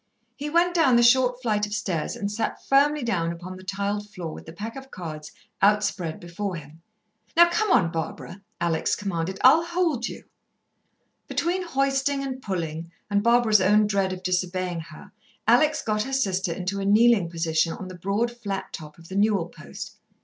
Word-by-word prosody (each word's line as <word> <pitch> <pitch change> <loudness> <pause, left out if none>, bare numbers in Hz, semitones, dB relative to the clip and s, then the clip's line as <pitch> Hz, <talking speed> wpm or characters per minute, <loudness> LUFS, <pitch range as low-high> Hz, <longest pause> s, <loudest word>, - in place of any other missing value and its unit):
He 290 +2 -5
went 340 +3 +3
down 320 -8 +4
the 240 - +5
short 250 +1 +4
flight 210 -3 +1
of 205 - -4
stairs 175 -1 -2
and 205 -4 -3
sat 220 +1 -3
firmly 285 +1 +3
down 170 -8 0
upon 175 +2 -8
the 185 - -12
tiled 200 +2 -3
floor 175 -6 -6
with - - -11
the - - -7
pack 210 +7 -7
of 270 0 -9
cards 155 - -7 0.3
out 210 +1 +4
spread 175 -5 -3
before 180 +2 -4
him. 155 0 -11 0.6
"Now 345 0 +7
come 430 +4 +1
on, 190 - +4
Barbara," 170 +3 -5 0.2
Alex 165 -2 0
commanded 190 -2 -3
her; - - -11
"I'll 290 +6 +7
hold 335 -8 0
you." - - -8 1.0
Between 355 +3 -1
hoisting 275 -3 0
and 260 -1 -5
pulling 170 -5 -4 0.2
and 205 0 +3
Barbara's 235 -2 +4
own 210 +3 +4
dread 200 -2 0
of 185 0 -6
disobeying 180 -1 -1
her, 165 - -11 0.4
Alex 310 0 +4
got 215 -1 0
her 270 +5 -4
sister 190 -9 0
into 185 +3 -3
a - - -2
kneeling 210 -3 +4
position 165 -1 0
on 190 - -7
the 185 - -8
broad 200 +7 -1
flat 200 -5 -5
top 150 -1 -9
of 165 0 -15
the 190 - -8
newel 200 -4 +2
post. 70 - -10
200 Hz, 185 wpm, -25 LUFS, 175-245 Hz, 1.0 s, Now